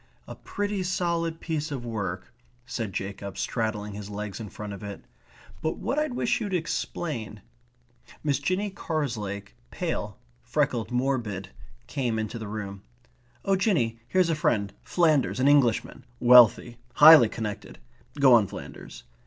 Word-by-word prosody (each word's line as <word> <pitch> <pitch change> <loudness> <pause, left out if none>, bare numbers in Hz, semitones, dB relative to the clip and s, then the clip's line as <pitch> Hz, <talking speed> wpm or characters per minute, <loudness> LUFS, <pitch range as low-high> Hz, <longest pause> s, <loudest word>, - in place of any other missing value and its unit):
"A - - -7
pretty 205 -1 -3
solid 170 -2 -1
piece 155 -2 -3
of 130 -4 -4
work," 100 -6 -4 0.3
said 115 -5 -4
Jacob, 100 0 -5
straddling 105 -3 -2
his 105 0 -7
legs 105 0 -5
in 110 -3 -6
front 105 0 -7
of 100 - -9
it. 100 -1 -8 0.6
"But 160 - -1
what 275 +4 -1
I 305 - +1
wish 250 -3 -1
you'd 205 -4 -2
explain 160 -7 -3 0.4
..." - - -24
Miss 140 -3 +1
Jinny 185 +7 -1
Carslake, 115 - -4 0.2
pale, - - -3 0.2
freckled, 110 - -1
morbid, 120 -7 -1 0.4
came 120 - -2
into 110 +2 -3
the 110 - -6
room. 100 -2 -6 0.6
"Oh 195 - +3
Jinny, 145 - +1
here's 180 +3 +2
a - - +1
friend. 100 -9 0
Flanders. 155 -8 +2
An 130 - +3
Englishman. 140 -6 +2 0.2
Wealthy. 120 -1 +6 0.2
Highly 150 -6 +9
connected. 105 -3 -6 0.4
Go 135 -3 +7
on, 110 -4 +5
Flanders...." - - -10
120 Hz, 145 wpm, -26 LUFS, 105-160 Hz, 0.6 s, Highly